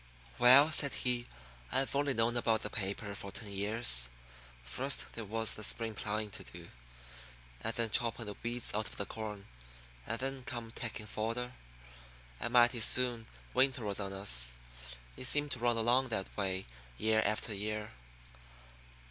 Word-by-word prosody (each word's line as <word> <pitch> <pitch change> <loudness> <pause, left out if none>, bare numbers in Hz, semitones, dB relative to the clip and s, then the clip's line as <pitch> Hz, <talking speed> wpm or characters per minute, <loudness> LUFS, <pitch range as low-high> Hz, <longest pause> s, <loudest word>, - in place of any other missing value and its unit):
"Well," 130 +5 +8
said 140 -2 +6
he, 125 -1 0 0.4
"I've 135 +1 0
only 140 -1 +1
known 115 +1 +2
about 115 -2 +1
the 105 - -3
paper 100 +1 -3
for 100 -1 -6
ten 100 +1 -7
years. 100 - +4 0.5
First 130 - -2
there 115 - -5
was 110 +2 0
the 110 - -7
spring 115 +1 -1
ploughin' 105 0 -3
to - - -7
do, - - -10 0.9
and - - 0
then 115 -2 +1
choppin' 115 0 0
the 105 -1 -6
weeds 120 0 0
out 110 +1 -1
of - - -8
the 100 - -1
corn; 105 -2 -7 0.6
and 115 - -1
then 135 +1 -2
come 120 -4 -6
takin' 115 -2 -5
fodder; 115 +4 -3 0.9
and 120 - -3
mighty 120 0 +4
soon 120 -1 +4 0.3
winter 130 -4 +2
was 100 -1 -1
on 100 -1 -3
us. 60 -12 0 0.6
It - - -5
seemed 145 +2 +2
to 125 - -4
run 120 0 +1
along 120 +4 +3
that 110 -5 -3
way 95 -2 -1 0.3
year 110 +4 +2
after 110 +1 -1
year." 105 +1 -4
115 Hz, 160 wpm, -33 LUFS, 105-120 Hz, 0.9 s, Well